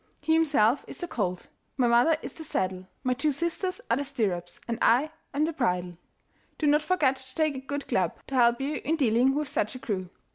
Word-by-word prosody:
He 315 Hz, +2 st, +1 dB
himself 285 Hz, -6 st, +3 dB
is -, -, -8 dB
the 350 Hz, -, -4 dB
colt, 185 Hz, -, -3 dB, 0.3 s
my 255 Hz, -, +3 dB
mother 240 Hz, +7 st, +4 dB
is -, -, -6 dB
the 320 Hz, -, -9 dB
saddle, 185 Hz, -8 st, -2 dB, 0.2 s
my 255 Hz, -, +2 dB
two 290 Hz, +4 st, +1 dB
sisters 340 Hz, +5 st, -2 dB
are 235 Hz, -, +2 dB
the 285 Hz, -, -1 dB
stirrups, 205 Hz, -11 st, -2 dB
and 230 Hz, -1 st, -2 dB
I 270 Hz, +7 st, +4 dB, 0.2 s
am 295 Hz, +2 st, +1 dB
the 330 Hz, -, -2 dB
bridle. 180 Hz, -, 0 dB, 0.6 s
Do 310 Hz, -, -1 dB
not 295 Hz, +1 st, +4 dB
forget 300 Hz, -5 st, +2 dB
to 260 Hz, 0 st, -11 dB
take 310 Hz, -3 st, +1 dB
a -, -, -4 dB
good 285 Hz, +2 st, -5 dB
club, 180 Hz, -3 st, 0 dB
to -, -, -10 dB
help 240 Hz, -2 st, +4 dB
you 280 Hz, +1 st, -2 dB
in 315 Hz, +5 st, +1 dB
dealing 260 Hz, -1 st, +3 dB
with 300 Hz, 0 st, -1 dB
such 215 Hz, -2 st, -1 dB
a -, -, -6 dB
crew. 190 Hz, -6 st, -3 dB
265 Hz, 220 wpm, -27 LUFS, 230-300 Hz, 0.6 s, mother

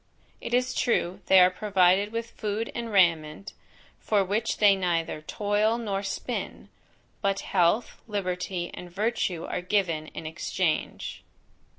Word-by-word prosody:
It 240 Hz, -, -1 dB
is 250 Hz, 0 st, +1 dB
true, 185 Hz, -8 st, 0 dB
they 190 Hz, -, +7 dB
are 180 Hz, 0 st, +6 dB
provided 190 Hz, 0 st, +2 dB
with 230 Hz, 0 st, -4 dB
food 215 Hz, +1 st, -3 dB
and 235 Hz, -1 st, -4 dB
raiment, 170 Hz, -1 st, +2 dB, 0.5 s
for 205 Hz, -3 st, +1 dB
which 215 Hz, +4 st, -1 dB
they 205 Hz, -2 st, +6 dB
neither 170 Hz, -4 st, -1 dB
toil 210 Hz, +6 st, 0 dB
nor 205 Hz, -4 st, -2 dB
spin; 195 Hz, -1 st, -5 dB, 0.5 s
but 195 Hz, -1 st, 0 dB
health, 190 Hz, +5 st, +1 dB
liberty, 180 Hz, -3 st, -3 dB
and 180 Hz, -, -8 dB
virtue 190 Hz, -3 st, -1 dB
are -, -, -3 dB
given 180 Hz, -5 st, 0 dB
in 160 Hz, -, -8 dB
exchange. 160 Hz, +1 st, -2 dB
195 Hz, 130 wpm, -27 LUFS, 175-210 Hz, 0.5 s, they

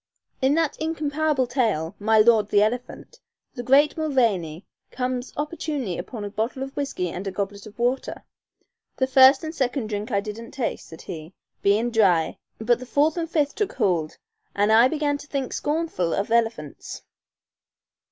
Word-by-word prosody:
In 265 Hz, +2 st, +3 dB
that 325 Hz, -3 st, 0 dB
incomparable 310 Hz, -3 st, 0 dB
tale, 220 Hz, -, 0 dB
"My 220 Hz, +1 st, +3 dB
Lord 215 Hz, -1 st, +5 dB
the 205 Hz, 0 st, +4 dB
Elephant," 245 Hz, -, -4 dB, 0.3 s
the 245 Hz, -, -5 dB
great 275 Hz, +5 st, +4 dB
Mulvaney 225 Hz, -, 0 dB, 0.2 s
comes 250 Hz, 0 st, -3 dB
opportunely 295 Hz, -, -3 dB
upon 220 Hz, -5 st, -6 dB
a -, -, -4 dB
bottle 230 Hz, +6 st, -2 dB
of 270 Hz, 0 st, -8 dB
whiskey 275 Hz, -11 st, -2 dB
and 185 Hz, +4 st, -6 dB
a -, -, -2 dB
goblet 200 Hz, +1 st, -5 dB
of 210 Hz, -, -14 dB
water. 245 Hz, +2 st, -1 dB, 0.7 s
"The 260 Hz, -, +2 dB
first 265 Hz, +1 st, +6 dB
and 315 Hz, 0 st, -4 dB
second 250 Hz, -6 st, -2 dB
dhrink 210 Hz, +2 st, -3 dB
I 200 Hz, -4 st, +1 dB
didn't 215 Hz, +3 st, -7 dB
taste," 255 Hz, -4 st, -3 dB
said 160 Hz, -, -12 dB
he, 160 Hz, +2 st, -8 dB, 0.3 s
"bein' 215 Hz, +4 st, +2 dB
dhry, 185 Hz, -8 st, +2 dB, 0.2 s
but 235 Hz, +2 st, +1 dB
the 255 Hz, -, -9 dB
fourth 295 Hz, +4 st, +2 dB
and 330 Hz, -2 st, -3 dB
fifth 295 Hz, -4 st, +1 dB
took 420 Hz, -2 st, -2 dB
hould, 175 Hz, -9 st, 0 dB, 0.4 s
an' 205 Hz, +2 st, +2 dB
I 230 Hz, +3 st, +7 dB
began 290 Hz, 0 st, -1 dB
to 290 Hz, -, -12 dB
think 275 Hz, -3 st, -3 dB
scornful 295 Hz, -, -1 dB
of 200 Hz, +3 st, -2 dB
elephants." 225 Hz, -11 st, -1 dB
240 Hz, 165 wpm, -24 LUFS, 205-285 Hz, 0.7 s, I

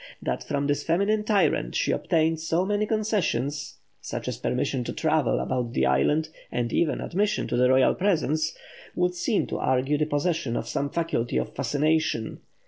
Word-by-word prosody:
That -, -, -3 dB
from 140 Hz, -1 st, -2 dB
this 145 Hz, 0 st, 0 dB
feminine 200 Hz, +6 st, +1 dB
tyrant 195 Hz, -, +1 dB
she -, -, +1 dB
obtained 160 Hz, 0 st, +1 dB
so 165 Hz, +3 st, 0 dB
many 205 Hz, +1 st, 0 dB
concessions 190 Hz, -, -1 dB, 0.2 s
such -, -, -5 dB
as -, -, -3 dB
permission 125 Hz, -, -1 dB
to -, -, -4 dB
travel 155 Hz, -4 st, +1 dB
about 125 Hz, -2 st, -2 dB
the -, -, +2 dB
island, 155 Hz, +1 st, +2 dB, 0.2 s
and 120 Hz, -1 st, -2 dB
even 160 Hz, -3 st, +1 dB
admission 205 Hz, +3 st, 0 dB
to -, -, 0 dB
the 125 Hz, +1 st, +4 dB
royal 130 Hz, 0 st, +5 dB
presence, 155 Hz, -5 st, 0 dB, 0.4 s
would 180 Hz, 0 st, +1 dB
seem 180 Hz, +5 st, 0 dB
to -, -, -4 dB
argue 130 Hz, +3 st, +1 dB
the 150 Hz, -, +1 dB
possession 145 Hz, -4 st, -1 dB
of 115 Hz, -, -4 dB
some 140 Hz, +4 st, -1 dB
faculty 150 Hz, -8 st, -1 dB
of -, -, -2 dB
fascination. 145 Hz, -3 st, 0 dB
155 Hz, 170 wpm, -26 LUFS, 135-180 Hz, 0.4 s, royal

